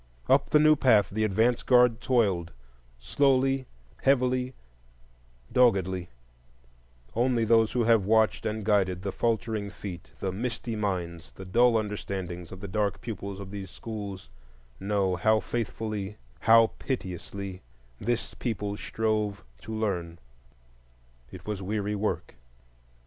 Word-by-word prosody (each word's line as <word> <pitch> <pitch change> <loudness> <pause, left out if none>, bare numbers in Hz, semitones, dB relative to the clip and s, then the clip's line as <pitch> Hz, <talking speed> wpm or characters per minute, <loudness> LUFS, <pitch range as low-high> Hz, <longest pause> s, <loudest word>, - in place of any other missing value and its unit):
Up - - +4
the - - +5
new 155 0 +6
path 115 -8 +4
the 110 +2 0
advance 110 +4 +2
guard 125 -2 +4
toiled, 100 -9 +1 0.4
slowly, 135 - +2 0.3
heavily, 130 -1 +2 1.0
doggedly; 95 -7 +2 1.1
only 120 -1 +2
those 115 0 +4
who 120 - +2
have 115 -2 +4
watched 110 +2 +3
and 110 -1 -3
guided 95 -4 +2
the 100 - -2
faltering 110 -2 -1
feet, 95 -4 -8
the 95 - -2
misty 115 +2 -3
minds, 90 -5 -3
the 95 - -10
dull 120 +5 +4
understandings, 95 -5 -4
of 95 - -9
the 100 - -5
dark 100 -1 -1
pupils 100 -3 -6
of 100 -1 -8
these 100 -2 -6
schools 100 - -7 0.5
know 95 -2 0
how 110 +4 +3
faithfully, 110 -3 -4 0.2
how 115 - +6
piteously, 95 -4 -5 0.4
this 120 0 -2
people 105 -4 -3
strove 105 -3 -1 0.2
to 110 - -9
learn. 95 -6 -2 1.1
It 95 +2 -11
was 105 -2 -3
weary 105 +1 -2
work. 105 - -3
105 Hz, 125 wpm, -28 LUFS, 95-115 Hz, 1.1 s, new